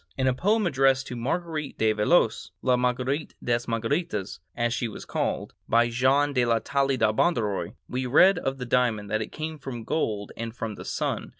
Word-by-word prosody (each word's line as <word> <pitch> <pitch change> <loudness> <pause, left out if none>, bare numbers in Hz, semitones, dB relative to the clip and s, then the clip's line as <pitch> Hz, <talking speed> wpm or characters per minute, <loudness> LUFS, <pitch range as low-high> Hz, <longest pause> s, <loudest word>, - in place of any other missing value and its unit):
In 130 - +1
a 130 - +3
poem 210 - +1
addressed 135 -4 +3
to 125 - -5
Marguerite 155 +4 -3
de 110 -1 +3
Valois,—"La 110 +4 +2
Marguerite 125 +4 -1
des 120 -1 +2
Marguerites," 115 - -2 0.2
as 120 0 0
she 120 - -1
was 110 - -8
called,—by 120 +1 0
Jean 135 +4 +2
de 125 -2 +2
la 115 -1 +3
Taille 135 +4 0
de 110 -2 +2
Bondaroy, 110 - 0
we 125 0 -2
read 180 +8 +6
of 135 -3 -2
the 125 - -5
diamond 115 -5 +1
that 110 0 +1
it 110 - -5
came 155 0 -5
from 125 -4 -6
gold 105 -7 -2
and 115 0 -5
from 115 -3 -4
the - - -9
sun. - - -2
125 Hz, 185 wpm, -26 LUFS, 115-140 Hz, 0.2 s, read